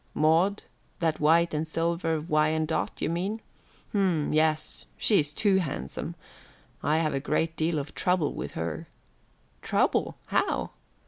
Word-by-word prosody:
"Maud, 165 +7 +3 0.3
that 160 -2 0
white 165 +3 +4
and 155 +1 -1
silver 165 0 0
Wyandotte, 155 0 0
you - - +1
mean. 190 +6 -2 0.5
H'm, 185 -8 +1
yes. 155 0 +1
She's 155 -9 +3
too 195 +4 +2
handsome. 135 - -3 0.7
I 155 +1 +2
have 155 -2 +1
a 135 - 0
great 160 +3 0
deal 160 0 0
of 145 0 -4
trouble 180 -5 +1
with 70 - -5
her." 80 -1 -4 0.7
"Trouble - - +1
how?" - - 0
160 Hz, 130 wpm, -28 LUFS, 150-170 Hz, 0.7 s, white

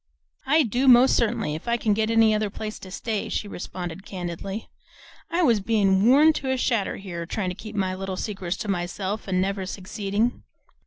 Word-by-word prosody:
"I 310 +3 +5
do 250 +3 0
most 250 +1 +7
certainly, 220 -9 0
if 155 - -7
I 235 0 +2
can 220 -2 +1
get 220 +1 0
any 225 -1 +5
other 215 -1 0
place 215 +2 -6
to 190 - -10
stay," 215 +3 -3
she 210 - -2
responded 175 -1 -6
candidly. 190 +3 -5 0.6
"I 350 +1 +1
was 235 -8 +4
bein' 200 -1 +2
worn 295 +5 +6
to 265 - -3
a 260 - +1
shadder 230 -5 0
here, 175 -4 -6
tryin' 185 -1 -2
to - - -7
keep 215 +2 -9
my 190 -2 0
little 190 0 -4
secrets 190 -3 -3
to 225 - -5
myself, 195 +3 -3
an' 185 -1 +1
never 195 +1 -1
succeedin'. 200 +4 -2
205 Hz, 195 wpm, -25 LUFS, 190-230 Hz, 0.6 s, most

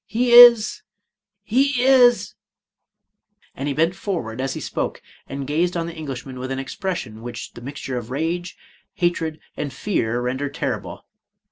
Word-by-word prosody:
— - - -70
He 240 +2 0
is 240 -2 +8 0.3
— 200 -1 -63
he 270 0 +3
is 250 -2 +5 0.6
" 210 0 -39
and 135 - -4
he 145 - -1
bent 165 +3 +2
forward 130 - -4
as 135 0 -2
he - - -4
spoke, - - -3 0.3
and 135 0 -5
gazed 170 +5 0
on 165 - -1
the 170 - -6
Englishman 135 -5 -7
with 130 +1 -5
an 135 - -3
expression 135 - -5
which 120 -1 -7
the 120 - -11
mixture 135 0 -5
of 115 -1 -10
rage, 165 +6 -3 0.4
hatred, 165 -3 -1 0.2
and 145 -2 -4
fear 120 - -1
rendered 130 +3 -3
terrible. - - -4
160 Hz, 165 wpm, -22 LUFS, 130-200 Hz, 0.6 s, is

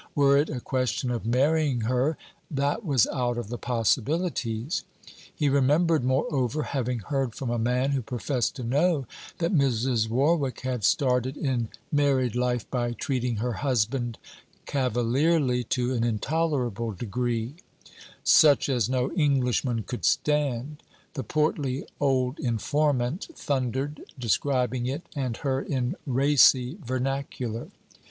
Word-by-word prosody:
Were 140 -1 +5
it 145 +2 +2
a 130 - -3
question 125 -1 -1
of 115 -2 -3
marrying 140 +1 +2
her! 125 +7 +1 0.3
That 145 +9 -1
was 140 - +3
out 120 -2 -1
of 120 -3 -4
the 120 - -5
possibilities. 125 - -1 0.5
He 150 - -1
remembered, 145 +3 +3
moreover, 135 +1 0
having 125 -2 -2
heard 135 0 -2
from 130 -3 -3
a 120 - 0
man, 125 +4 +1
who 135 -2 0
professed 120 0 -2
to 130 - -6
know, 145 +4 +1 0.3
that 170 +2 0
Mrs. 125 -6 +2
Warwick 135 +1 +1
had 125 -3 -3
started 130 +2 +2
in 125 -5 -1 0.2
married 135 -5 +2
life 125 -2 0
by 120 -2 -1
treating 125 -1 -2
her 120 +3 -2
husband 120 -2 -1 0.5
cavalierly 130 +2 +1
to 125 +2 0
an 115 -2 0
intolerable 120 -2 -1
degree: 120 +3 -2 0.7
'Such 145 -3 +5
as 125 -4 +1
no 130 0 0
Englishman 130 - +1
could 120 +5 -6
stand,' 150 -1 0 0.3
the 135 -4 -4
portly 150 -3 -1
old 130 -1 +1
informant 140 - 0
thundered, 135 +2 -2 0.2
describing 125 0 0
it 140 +6 -3
and 130 -5 -2
her 135 -1 -1
in 130 -4 -2
racy 135 +2 +4
vernacular. 130 -2 -3
130 Hz, 130 wpm, -26 LUFS, 120-145 Hz, 0.7 s, Were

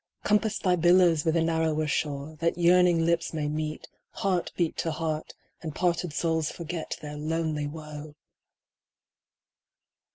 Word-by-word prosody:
Compass 210 +1 +2
thy 180 -2 +2
billows 175 -2 +4
with 160 0 +2
a 165 - +3
narrower 160 -1 +1
shore, 145 0 -2
That 170 0 0
yearning 175 -1 +4
lips 170 -1 0
may 150 -2 -1
meet, 155 +1 -3 0.3
heart 185 -3 -1
beat 170 -3 0
to 165 - -1
heart, 155 -1 -3 0.3
And 155 -3 -6
parted 175 -1 0
souls 160 +1 0
forget 170 -1 -5
their 150 0 -6
lonely 155 -1 -1
woe 150 -1 -8
160 Hz, 135 wpm, -27 LUFS, 155-175 Hz, 0.3 s, billows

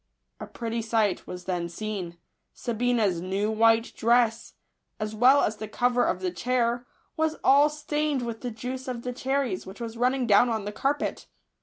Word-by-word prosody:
A - - -7
pretty 230 -1 -4
sight 220 -3 0
was 180 0 -7
then 175 -2 -2
seen. 185 -2 -5 0.4
Sabina's 230 -6 0
new 195 +4 -1
white 225 +1 +3
dress, 235 0 +2 0.5
as 215 0 -3
well 255 +6 +5
as 215 - -1
the 215 - -6
cover 245 +3 +1
of 185 - -1
the 185 -1 -1
chair, 240 +5 0 0.3
was 315 -1 0
all 285 +2 +6
stained 300 -2 -1
with 230 -1 -5
the 245 - -3
juice 255 +3 -6
of 240 -2 -4
the 250 - -3
cherries, 260 -6 -2
which 190 +4 -10
was 230 -1 -6
running 250 +1 +1
down 235 +2 +5
on 220 -3 -2
the 205 - -3
carpet. 275 +6 -2
235 Hz, 175 wpm, -26 LUFS, 210-250 Hz, 0.5 s, all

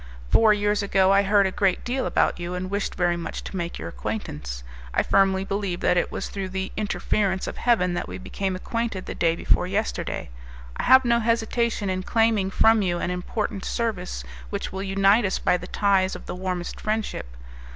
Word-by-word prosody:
Four 220 -1 +6
years 210 0 +2
ago 195 -1 +3
I 195 0 +5
heard 200 0 +4
a 190 - 0
great 195 -1 +1
deal 255 +2 -1
about - - +1
you, 175 +1 -4
and 185 +1 -4
wished 200 0 -2
very 175 -2 +1
much 170 - -5
to - - -7
make 170 -2 -3
your 80 - -6
acquaintance; - - -5 0.3
I - - +3
firmly 195 -1 +3
believe 195 -3 -2
that - - +3
it 175 - +1
was - - -4
through 195 -2 -5
the 190 0 -3
interference 200 -2 0
of - - -6
Heaven 200 -7 +2
that 175 - -3
we - - -6
became 190 0 -3
acquainted 225 0 -3
the - - -5
day 165 -1 +1
before 180 - +1
yesterday. 200 - -2 0.4
I - - -3
have 260 0 +8
no 235 0 +3
hesitation 230 -1 0
in 185 0 -1
claiming 220 -1 +2
from 225 +2 +4
you 175 -3 0
an 180 - -2
important 195 +3 -3
service 195 - -2 0.3
which - - -4
will 190 - -4
unite 195 +3 +3
us 190 - 0
by - - +2
the 180 0 -5
ties 195 -2 +2
of - - -9
the - - -5
warmest 180 -1 -4
friendship. 215 - -3
195 Hz, 200 wpm, -24 LUFS, 180-215 Hz, 0.4 s, have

